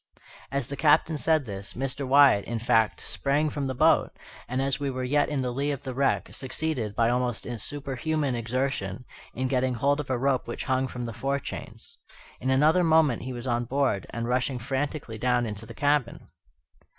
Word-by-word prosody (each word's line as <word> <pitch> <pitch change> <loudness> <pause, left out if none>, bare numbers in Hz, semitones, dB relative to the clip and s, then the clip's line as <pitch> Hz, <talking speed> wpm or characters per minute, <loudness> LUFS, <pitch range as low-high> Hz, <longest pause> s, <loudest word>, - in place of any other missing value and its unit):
As 140 -2 -1
the 140 - -5
Captain 155 +2 +3
said 160 -2 +2
this, 100 -2 -6
Mr. 135 +1 -2
Wyatt, 135 -6 +6
in 120 - -3
fact, 115 -1 +2
sprang 145 +2 0
from 140 -1 -2
the 130 - -3
boat, - - +4 0.4
and, 130 +1 -2
as 135 +1 0
we 140 -1 -1
were 130 -1 -3
yet 145 +3 +2
in 140 -3 -1
the 125 - -1
lee 140 +3 -1
of 140 -1 -3
the 130 - -4
wreck, 135 +2 0
succeeded, 130 -5 -3
by 115 +1 +3
almost 125 -2 -1
superhuman 145 +3 -2
exertion, 120 -2 -2 0.3
in 130 +2 -1
getting 130 -1 +1
hold 140 +4 +1
of 150 - -5
a 130 - +1
rope 135 +1 0
which 120 - -4
hung 130 0 +1
from 125 -1 -5
the 115 - -5
forechains. 140 +5 -5 0.4
In 130 - -2
another 155 +7 +4
moment 160 -6 +4
he 130 - -5
was 120 0 -6
on 120 -1 0
board, 130 -6 0
and 115 0 -4
rushing 125 +2 0
frantically 135 -1 -3
down 125 0 +2
into 105 0 -6
the - - -10
cabin. 145 -4 0
130 Hz, 190 wpm, -27 LUFS, 120-140 Hz, 0.4 s, Wyatt